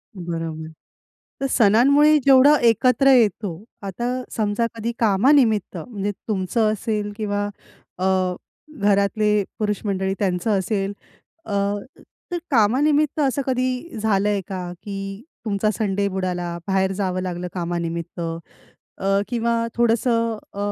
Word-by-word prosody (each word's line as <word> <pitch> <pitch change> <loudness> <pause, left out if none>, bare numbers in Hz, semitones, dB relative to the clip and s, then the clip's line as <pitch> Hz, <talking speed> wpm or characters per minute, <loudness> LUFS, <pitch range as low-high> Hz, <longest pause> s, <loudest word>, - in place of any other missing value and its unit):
बरोबर. 165 -3 -5 0.7
तर - - 0
सणांमुळे 275 +8 +5
जेवढं 275 +2 +7
एकत्र 255 +4 +3
येतो, 205 -6 +1 0.2
आता 200 +4 -5 0.3
समजा 215 +1 0
कधी 230 +1 -3
कामानिमित्त 220 -1 +3
म्हणजे 205 +3 -4 0.2
तुमचं 215 +2 +1
असेल 210 -1 -2
किंवा 205 -1 -1 0.5
अ, 185 -1 +1 0.5
घरातले 205 +1 +2 0.2
पुरुष 210 -1 0
मंडळी 190 -1 -1
त्यांचं 185 +1 0
असेल 195 0 -2 0.5
अ, - - -7 0.8
तर 350 - -1
कामानिमित्त 285 +6 +3
असं 280 -1 +1
कधी 255 +3 -2
झालंय 205 -1 +1
का, 180 -2 -5
की 195 +1 -6 0.2
तुमचा 210 0 0
संडे 200 -2 0
बुडाला, 180 -3 -3
बाहेर 190 0 +1
जावं 185 -2 -2
लागलं 180 -1 -4
कामानिमित्त 170 -1 -4 0.8
अ, 195 +1 +1
किंवा 235 -1 0
थोडंसं 230 -1 +2 0.2
अ, - - -8
205 Hz, 115 wpm, -22 LUFS, 190-235 Hz, 0.8 s, जेवढं